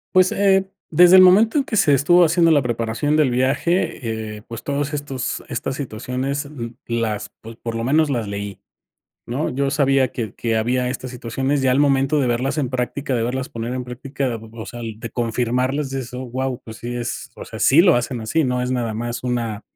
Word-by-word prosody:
Pues, 185 Hz, 0 st, +5 dB
eh, 195 Hz, -1 st, +3 dB, 0.2 s
desde 175 Hz, +3 st, +7 dB
el 185 Hz, -, +10 dB
momento 205 Hz, +8 st, +6 dB
en 280 Hz, -, +3 dB
que 220 Hz, -, -2 dB
se 145 Hz, -, +4 dB
estuvo 175 Hz, +6 st, +5 dB
haciendo 165 Hz, 0 st, +4 dB
la 145 Hz, -3 st, +5 dB
preparación 120 Hz, +4 st, -1 dB
del 150 Hz, -5 st, +3 dB
viaje, 125 Hz, -, -1 dB
eh, -, -, -15 dB
pues, 115 Hz, -1 st, -7 dB
todos 145 Hz, +1 st, -2 dB
estos 140 Hz, -3 st, -3 dB
estas 135 Hz, -, -3 dB
situaciones 130 Hz, +2 st, -3 dB
m 125 Hz, -5 st, -7 dB
las, 110 Hz, -3 st, -2 dB
pues, 115 Hz, +1 st, -11 dB
por 115 Hz, 0 st, -5 dB
lo 115 Hz, 0 st, -2 dB
menos 155 Hz, +4 st, +3 dB
las 120 Hz, -6 st, -1 dB
leí, 100 Hz, 0 st, -5 dB, 0.7 s
¿no? 130 Hz, +6 st, -2 dB
Yo 135 Hz, +2 st, -1 dB
sabía 135 Hz, -3 st, +3 dB
que 110 Hz, -5 st, -4 dB
que 115 Hz, -1 st, -1 dB
había 125 Hz, +3 st, 0 dB
estas 130 Hz, 0 st, -5 dB
situaciones, 130 Hz, +3 st, -2 dB
ya 130 Hz, -1 st, +3 dB
al 130 Hz, -, +3 dB
momento 140 Hz, 0 st, +3 dB
de 135 Hz, -, +1 dB
verlas 125 Hz, +5 st, -1 dB
en 135 Hz, -5 st, 0 dB
práctica, 130 Hz, +2 st, -2 dB
de 115 Hz, -, 0 dB
verlas 130 Hz, +3 st, -2 dB
poner 115 Hz, +1 st, -5 dB
en 125 Hz, -1 st, -4 dB
práctica, 130 Hz, 0 st, -3 dB, 0.2 s
o 110 Hz, -2 st, -8 dB
sea, 120 Hz, +5 st, -8 dB
de 115 Hz, 0 st, -6 dB
confirmarlas, 125 Hz, +4 st, -1 dB
dices: 130 Hz, -2 st, -5 dB
"Oh, 130 Hz, +1 st, -5 dB
guau", 130 Hz, +1 st, -3 dB
pues 110 Hz, -1 st, -9 dB
sí 120 Hz, +1 st, -5 dB
es, 120 Hz, -1 st, -5 dB
o -, -, -9 dB
sea, -, -, -9 dB
sí 140 Hz, -, +5 dB
lo 175 Hz, -2 st, +6 dB
hacen 120 Hz, 0 st, -1 dB
así, 115 Hz, +9 st, 0 dB
no 125 Hz, -2 st, 0 dB
es 125 Hz, 0 st, -2 dB
nada 120 Hz, -3 st, -1 dB
más 120 Hz, +3 st, -4 dB
una 115 Hz, -4 st, -2 dB
130 Hz, 210 wpm, -21 LUFS, 115-145 Hz, 0.7 s, el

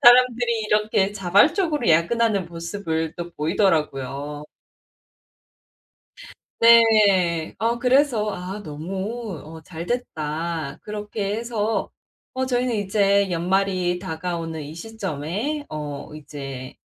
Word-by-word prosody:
사람들이 240 Hz, -1 st, +6 dB
이렇게 210 Hz, -2 st, +2 dB
자발적으로 240 Hz, -, +3 dB
야근하는 195 Hz, +4 st, +3 dB
모습을 165 Hz, -2 st, -3 dB
또 175 Hz, 0 st, -5 dB
보이더라고요. 150 Hz, -4 st, -1 dB, 2.1 s
네. 210 Hz, -8 st, +5 dB
어 230 Hz, +1 st, 0 dB
그래서 250 Hz, -4 st, +3 dB
'아 190 Hz, +3 st, -6 dB
너무 190 Hz, +7 st, -5 dB
어 160 Hz, +1 st, -10 dB
잘됐다.' 165 Hz, -, -4 dB
그렇게 210 Hz, -1 st, -3 dB
해서 225 Hz, -2 st, -1 dB, 0.4 s
어 260 Hz, 0 st, -1 dB
저희는 245 Hz, -2 st, 0 dB
이제 200 Hz, -1 st, +2 dB
연말이 180 Hz, +1 st, +1 dB
다가오는 165 Hz, -3 st, -4 dB
이 145 Hz, -, -8 dB
시점에 210 Hz, -, -4 dB
어 150 Hz, 0 st, -6 dB
이제 135 Hz, -3 st, -8 dB
190 Hz, 225 characters per minute, -23 LUFS, 160-225 Hz, 2.1 s, 사람들이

